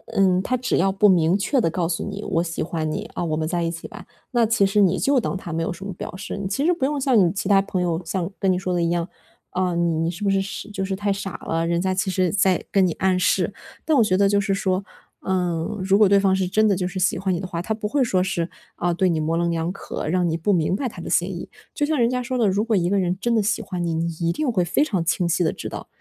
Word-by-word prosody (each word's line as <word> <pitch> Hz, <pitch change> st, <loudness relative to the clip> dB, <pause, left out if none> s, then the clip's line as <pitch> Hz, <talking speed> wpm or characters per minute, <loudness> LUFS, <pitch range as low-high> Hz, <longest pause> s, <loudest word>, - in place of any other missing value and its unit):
嗯， 185 Hz, -2 st, +3 dB
他 255 Hz, +6 st, -1 dB
只 250 Hz, +1 st, 0 dB
要 195 Hz, +2 st, +3 dB
不 200 Hz, +2 st, +4 dB
明 175 Hz, -1 st, +4 dB
确 255 Hz, +6 st, +1 dB
地 165 Hz, -, +2 dB
告 170 Hz, 0 st, -1 dB
诉 165 Hz, -, -2 dB
你： 205 Hz, +1 st, -5 dB
“我 165 Hz, +1 st, 0 dB
喜 165 Hz, -1 st, -3 dB
欢 160 Hz, -1 st, -2 dB
你， -, -, -3 dB
啊， -, -, -3 dB
我 160 Hz, -2 st, -1 dB
们 155 Hz, -, -1 dB
在 175 Hz, +1 st, -1 dB
一 165 Hz, -, 0 dB
起 165 Hz, -1 st, -7 dB
吧。 210 Hz, -4 st, -11 dB, 0.3 s
“那 240 Hz, -2 st, +3 dB
其 220 Hz, -3 st, +3 dB
实 200 Hz, +1 st, +2 dB
你 190 Hz, -1 st, +3 dB
就 275 Hz, -1 st, +2 dB
当 210 Hz, -, -2 dB
他 170 Hz, -3 st, -7 dB
没 165 Hz, -, -1 dB
有 165 Hz, -, -1 dB
什 175 Hz, +3 st, -8 dB
么 195 Hz, -, -5 dB
表 175 Hz, -, -7 dB
示。 200 Hz, +1 st, -6 dB
其 275 Hz, +9 st, -1 dB
实 355 Hz, -, +4 dB
不 335 Hz, -, -5 dB
用 290 Hz, +1 st, -1 dB
像 260 Hz, -3 st, +3 dB
你 175 Hz, -4 st, +4 dB
其 200 Hz, -, -3 dB
他 195 Hz, -1 st, +5 dB
朋 190 Hz, -2 st, -2 dB
友 170 Hz, -1 st, -1 dB
像 175 Hz, 0 st, -2 dB
跟 195 Hz, -2 st, +2 dB
你 180 Hz, -, +1 dB
说 185 Hz, 0 st, -2 dB
的 175 Hz, -, +1 dB
一 170 Hz, -, +1 dB
样， 170 Hz, 0 st, -1 dB, 0.4 s
啊， 180 Hz, -1 st, 0 dB
你 170 Hz, -1 st, +1 dB
你 165 Hz, -, 0 dB
是 175 Hz, +4 st, -8 dB
不 200 Hz, -, +2 dB
是 195 Hz, -, +2 dB, 0.3 s
就 195 Hz, -1 st, -3 dB
是 190 Hz, 0 st, -2 dB
太 200 Hz, +1 st, 0 dB
傻 195 Hz, -2 st, -5 dB
了， 165 Hz, 0 st, 0 dB
人 170 Hz, 0 st, +1 dB
家 185 Hz, +1 st, 0 dB
其 190 Hz, +1 st, -1 dB
实 185 Hz, -2 st, +1 dB
在 190 Hz, -2 st, +2 dB
跟 195 Hz, -2 st, +4 dB
你 165 Hz, -, -1 dB
暗 190 Hz, -1 st, +1 dB
示， -, -, +1 dB, 0.3 s
但 315 Hz, -, +2 dB
我 235 Hz, -, +6 dB
觉 185 Hz, -3 st, +2 dB
得 200 Hz, 0 st, +4 dB
就 200 Hz, 0 st, +3 dB
是 200 Hz, 0 st, 0 dB
说， 195 Hz, 0 st, -1 dB, 0.4 s
嗯， 180 Hz, +1 st, -1 dB
如 195 Hz, +1 st, +3 dB
果 210 Hz, -1 st, +6 dB
对 200 Hz, 0 st, +5 dB
方 195 Hz, -1 st, +3 dB
是 190 Hz, -1 st, 0 dB
真 215 Hz, +4 st, +3 dB
的 200 Hz, -, +3 dB
就 180 Hz, 0 st, -1 dB
是 185 Hz, +1 st, -5 dB
喜 185 Hz, -, +2 dB
欢 190 Hz, 0 st, 0 dB
你 175 Hz, -, -1 dB
的 190 Hz, -, -5 dB
话， 170 Hz, -2 st, -4 dB
他 220 Hz, +5 st, -2 dB
不 215 Hz, -1 st, -3 dB
会 275 Hz, +4 st, +1 dB
说 185 Hz, -6 st, +1 dB
是， 185 Hz, -3 st, -1 dB, 0.3 s
啊， 175 Hz, 0 st, 0 dB
对 185 Hz, +1 st, +2 dB
你 165 Hz, -2 st, 0 dB
模 155 Hz, +2 st, 0 dB
棱 170 Hz, 0 st, +1 dB
两 165 Hz, +1 st, -1 dB
可， 195 Hz, -, -6 dB
让 180 Hz, +2 st, +1 dB
你 160 Hz, -, -1 dB
不 205 Hz, +5 st, +1 dB
明 175 Hz, +1 st, +1 dB
白 255 Hz, +5 st, -2 dB
他 -, -, -10 dB
的 -, -, -6 dB
心 -, -, +2 dB
意。 -, -, -7 dB, 0.2 s
就 295 Hz, -, -2 dB
像 310 Hz, 0 st, 0 dB
人 235 Hz, -, +4 dB
家 250 Hz, 0 st, -1 dB
说 255 Hz, +1 st, -2 dB
的， 230 Hz, -, +3 dB
如 200 Hz, +2 st, +1 dB
果 225 Hz, -1 st, +1 dB
一 175 Hz, -2 st, +1 dB
个 200 Hz, 0 st, +2 dB
人 180 Hz, 0 st, 0 dB
真 235 Hz, +2 st, +1 dB
的 220 Hz, -, +3 dB
喜 220 Hz, +2 st, 0 dB
欢 180 Hz, -4 st, -4 dB
你， 165 Hz, -, -1 dB
你 165 Hz, +1 st, 0 dB
一 170 Hz, 0 st, +2 dB
定 295 Hz, -, -1 dB
会 185 Hz, -6 st, +1 dB
非 175 Hz, -, +2 dB
常 195 Hz, -, -1 dB
清 175 Hz, +1 st, 0 dB
晰 170 Hz, +1 st, +1 dB
地 160 Hz, -, +2 dB
知 -, -, -6 dB
道。 -, -, -7 dB
190 Hz, 330 characters per minute, -23 LUFS, 170-205 Hz, 0.4 s, 我